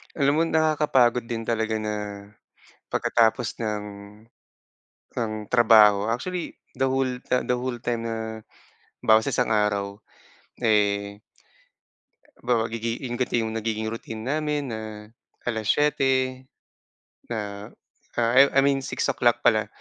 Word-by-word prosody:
Alam 140 -1 +2
mo, - - +3
nakakapagod 150 -7 +2
din 115 -1 -4
talaga 110 -1 -1
na, 105 -1 -5 0.6
pagkatapos 115 +1 +1
ng 105 -2 -2 1.3
ng 115 -2 -2 0.2
trabaho. 110 -4 +6
Actually, 175 +10 -3 0.2
the 135 0 0
whole, 135 0 +1 0.2
the 125 - +1
the - - 0
whole 125 0 -3
time 120 -1 -2
na, 110 -1 -4 0.6
halimbawa 110 0 +6
sa - - -2
isang - - +1
araw, 100 -2 0 0.6
eh 100 -1 +1 1.2
halimbawa, 120 -2 +1
gigi 115 +1 -3
'yung 120 - -4
ganito 120 -1 0
'yung 110 -1 -3
nagiging 110 0 -2
routine 110 0 -6
namin 150 +3 -2
na 110 -3 -5 0.7
7:00, 130 +2 +1 0.8
na, 105 -3 -5 0.5
ah, 115 -1 +1
I 140 - +9
I 135 - +6
mean 140 0 +3
6:00 120 -2 0
pala 110 -2 +3
115 Hz, 120 wpm, -25 LUFS, 110-130 Hz, 1.3 s, I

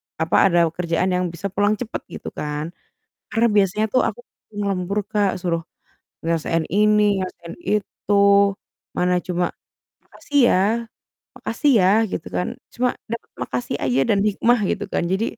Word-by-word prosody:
p - - -72
apa, 160 - 0
ada 175 -2 +3 0.2
kerjaan 175 +1 0
yang 180 0 0
bisa 170 +4 -4
pulang 205 +2 +2
cepet 240 -3 -4
gitu - - -6
kan. 150 +2 -3 0.6
Karena 230 0 +3
biasanya 205 +2 +3
tuh 255 - +5
aku - - -5 0.4
ngelembur, 200 0 -1
Kak, 205 -3 +1
suruh 170 -2 -1 0.6
nyelesain 165 0 0
ini 210 +1 +3
nyelesain 185 -2 -6
itu. 210 0 -1 0.8
Mana 180 0 +2
cuma 180 -1 0 0.6
"Makasih 290 - -3
ya, - - +4 0.8
makasih 295 - 0
ya," 185 - +4 0.2
gitu - - -4
kan, 180 - 0 0.3
cuma 250 0 +1 0.2
dapet 230 - -5
makasih 125 0 -3
aja 130 0 +2
dan 205 - +3
hikmah 230 +3 +3
gitu - - -2
kan. - - 0
Jadi, 195 +4 +1
190 Hz, 150 wpm, -22 LUFS, 170-210 Hz, 0.8 s, tuh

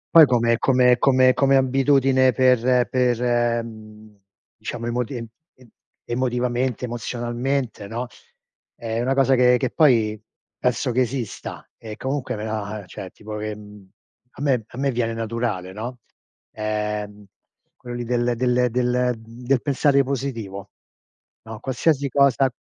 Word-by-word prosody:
Poi 160 -3 +10
come 115 -2 +2
come 125 -2 +4
come 130 -1 +5
come 135 -1 +3
abitudine 135 -1 +3
per 125 0 +3
per, 120 -2 +1
mhmm, 110 -1 -13 0.4
diciamo 120 -1 -6
emotie 120 0 -3 0.3
e 125 -2 -19 0.4
emotivamente, 125 0 -1
emozionalmente, 120 0 -3
no, 120 +4 -4 0.7
è 115 0 -3
una 135 +2 0
cosa 135 -1 +3
che 125 0 +5
che 130 -2 -2
poi 115 -9 +3 0.4
penso 125 - 0
che 130 +2 +2
esista, 125 -2 -4
e 110 -2 -8
comunque 130 -2 -3
me 105 - -6
la 105 -1 -4
cioè 95 +1 -8
tipo 105 +2 -8
che, 105 0 -4
mhmm, 105 -2 -14 0.4
a - - -11
me 130 -6 +1
a 120 - -13
me 135 0 0
viene 115 -1 -1
naturale, 110 -5 -3
no, 120 +4 -6 0.5
ehm, 105 -1 -3 0.5
quello 120 0 -8
lì 120 - -3
del 120 0 0
del 125 0 +2
del 125 +1 +1
mhmm, 115 +2 -14
del 130 -1 +2
pensare 140 0 +3
positivo. 115 -8 -4 0.7
No, 110 -1 -9
qualsiasi 140 +3 0
cosa 135 -1 +3
120 Hz, 140 wpm, -22 LUFS, 110-130 Hz, 0.7 s, Poi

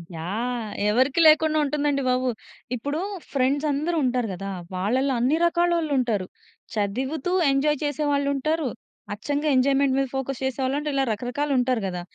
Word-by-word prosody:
Yeah! 220 +7 -3 0.2
ఎవరికీ 260 +7 +2
లేకుండా 310 0 +5
ఉంటుందండి 290 -1 0
బాబు. 255 0 +1 0.5
ఇప్పుడు 285 +6 -3 0.3
ఫ్రెండ్స్ 275 +2 +1
అందరూ 310 +5 -1
ఉంటారు 250 -2 0
కదా! 195 +2 -6 0.3
వాళ్ళలో 255 +9 +1
అన్ని 260 +6 +2
రకాలోళ్ళుంటారు. 315 - +1 0.5
చదువుతూ 260 - -2 0.2
ఎంజాయ్ 295 +2 +2
చేసేవాళ్ళుంటారు. 290 +1 0 0.5
అచ్చంగా 290 +8 -2
ఎంజాయ్‌మెంట్ 270 +1 +3
మీద 270 - +1
ఫోకస్ 270 -1 -3
చేసేవాళ్ళుంటారు. 275 +3 -1
ఇలా 270 - +2
రకరకాలుంటారు 250 0 0
కదా! 180 -1 -4
270 Hz, 120 wpm, -24 LUFS, 245-290 Hz, 0.5 s, లేకుండా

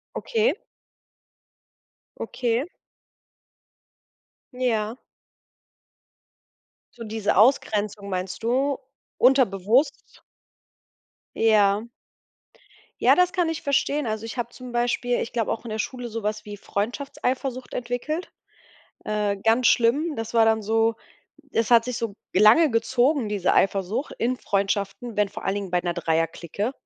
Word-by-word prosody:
Okay. 460 0 +1 1.7
Okay. 240 +1 -1 1.9
Ja. 235 -3 -1 2.0
So 230 -2 -9
diese 215 -3 -1
Ausgrenzung 210 -4 +2
meinst 185 +1 -4
du, 265 +4 +1 0.4
unterbewusst? 250 - +2 1.1
Ja. 210 -1 +3 1.2
Ja, - - +6
das 360 0 +3
kann 350 -3 +1
ich 325 0 -4
verstehen. 285 +1 +1
Also, 220 0 -3
ich 230 - -7
habe 240 -1 -2
zum 255 0 -10
Beispiel, 240 0 0
ich 230 - -5
glaube 230 -3 0
auch 230 - -4
in 225 - -6
der 220 - -3
Schule, 245 +2 -4
so 230 0 -5
was 210 0 -3
wie 205 -1 -7
Freundschaftseifersucht 255 +4 -3
entwickelt. 250 +8 -3 0.7
Äh, 210 -1 -1
ganz 225 +5 +2
schlimm. 285 +8 +3
Das 225 -2 -6
war 225 -1 +6
dann 220 0 +2
so 225 +2 +2 0.6
es 230 -1 0
hat 230 -1 +6
sich 250 -1 -3
so 230 -4 -3 0.2
lange 220 - +6
gezogen, 245 +2 +1
diese 205 -3 0
Eifersucht 195 +7 0
in 250 +2 0
Freundschaften, 200 +3 -2
wenn 205 -1 +2
vor 205 +2 -9
allen 195 - 0
Dingen 200 -2 -4
bei 180 - +2
'ner 175 0 -1
Dreierclique. 170 - -1
230 Hz, 125 wpm, -24 LUFS, 205-255 Hz, 2.0 s, Ja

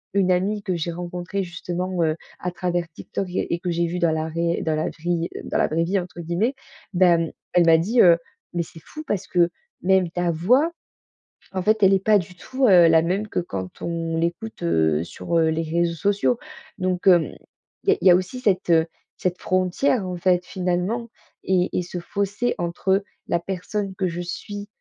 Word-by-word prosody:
une 190 -2 +3
amie 200 +3 0
que 185 -3 -1
j'ai 170 0 -2
rencontrée 175 +3 -4
justement, 180 +1 -3
heu, 155 -1 +1 0.2
à 180 - -2
travers 175 -1 -2
TikTok 185 +4 -5
et 180 - -2
et 170 - -1
que 180 - -3
j'ai 170 0 +1
vue 175 +1 -3
dans 170 -2 +3
la 160 0 -1
réell 170 +1 -1
dans 160 -1 0
la 155 - -1
vrie 170 +1 -2
heu, - - -5
«dans - - -2
la - - +3
vraie 165 +2 0
vie», 190 +4 +1
entre 175 -1 -8
guillemets. 175 - 0 0.4
Bah, 180 0 +5
hem, 165 -1 -1 0.2
elle 175 -1 +5
m'a 165 0 +7
dit, 215 +9 +3
heu: 170 -2 +7 0.4
«Mais 175 -1 0
c'est 165 0 -14
fou 310 - -9
parce 200 - -2
que 175 -1 +3 0.3
même 190 -1 +3
ta 175 0 0
voix, 250 - +3 0.8
en 190 - -1
fait, 215 +2 +2
elle 195 0 +7
est 190 -1 +2
pas 215 0 +5
du 180 0 -8
tout, 260 +8 -1
heu, 180 -5 +7
la 160 0 +6
même 190 +5 -1
que - - -1
quand 95 - -6
on 165 -1 -2
l'écoute, 170 +7 -3
heu, 80 -2 +2
sur, 170 - -3
heu, 165 -1 +4
les 160 +1 0
réseaux 170 +1 0
sociaux». 205 +6 +1 0.4
Donc 185 0 -1
hem, 170 - +5 0.5
il - - 0
y - - +7
a - - -3
il - - +4
y - - +10
a - - +8
aussi 185 +8 -2
cette, 200 -8 +1
heu, 160 -1 +5 0.3
cette 180 -1 -2
frontière, 185 +5 +1
en 180 - -3
fait, 180 0 +2
finalement 185 +7 -2 0.3
et 185 -1 +2
et - - +2
ce 180 +1 -7
fossé 200 +6 -1
entre 190 +3 0 0.2
la 170 - +1
personne 190 +2 -4
que 190 0 0
je 175 0 -4
suis, 205 +3 -6
180 Hz, 215 wpm, -23 LUFS, 170-190 Hz, 0.8 s, y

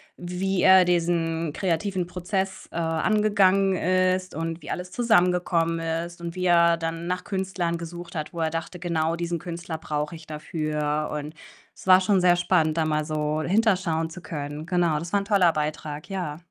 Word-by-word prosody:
wie 180 +1 -2
er 185 -1 +7
diesen 165 -2 0
kreativen 185 0 -1
Prozess, 190 +2 -3
äh, - - -13
angegangen 195 +3 +2
ist 185 -1 +1
und 165 +1 -4
wie 150 - -10
alles 180 0 -4
zusammengekommen 180 -7 +2
ist 165 +1 -4
und 170 +1 -5
wie 185 - -2
er 170 -1 +5
dann 165 +1 -4
nach 180 0 -2
Künstlern 190 -3 -2
gesucht 175 +1 -8
hat, 155 -3 -4
wo 170 - -5
er 160 -1 0
dachte: 165 +2 -4
„Genau 165 -2 -1
diesen 170 0 -3
Künstler 170 -1 -6
brauche 150 0 -3
ich 160 -1 -13
dafür.“ 150 -1 -2
Und 150 0 -5 0.4
es - - -14
war 185 0 +8
schon 190 0 +2
sehr 180 -1 +5
spannend, 160 -2 +1
da 160 - +2
mal 155 -1 0
so 155 0 -1
hinterschauen 180 -4 +1
zu 180 +3 -9
können. 150 -1 -6
Genau, 175 -4 +1
das 170 +2 -7
war 200 - +4
'n - - -7
toller 195 -4 +4
Beitrag, 150 -1 -4
ja. 175 -6 -3
170 Hz, 180 wpm, -25 LUFS, 160-185 Hz, 0.4 s, war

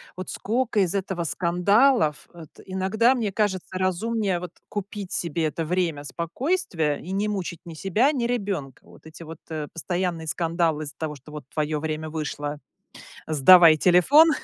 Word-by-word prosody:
Вот 185 0 -7
скока 230 0 -1
из 185 0 +1
этого 190 -3 -2
скандалов. 180 - +2
Вот 165 -3 -12 0.2
иногда, 200 +7 +2
мне 220 -5 -1
кажется, 195 -3 -1
разумнее 190 0 0
вот 180 -1 -7 0.2
купить 200 -1 -6
себе 165 -1 -1
это 160 +1 -2
время 165 -4 -1
спокойствия 170 - -1
и 180 - -8
не 200 +2 0
мучить 185 -5 -4
ни 165 - -8
себя, 200 - +1
ни 255 -6 -1
ребёнка. 195 - -3
Вот - - -17
эти 165 +1 -11
вот, 160 0 -10
э, 155 -2 -4
постоянные 175 -1 -3
скандалы 165 -1 0
из-за 150 +1 -7
того, 155 -2 -4
что 140 +3 -15
вот: 150 -4 -8
"Твоё 155 -1 -1
время 155 0 -4
вышло, 150 -1 -4 0.7
сдавай 160 +2 +7
телефон". 260 - +6
175 Hz, 160 wpm, -24 LUFS, 155-200 Hz, 0.7 s, сдавай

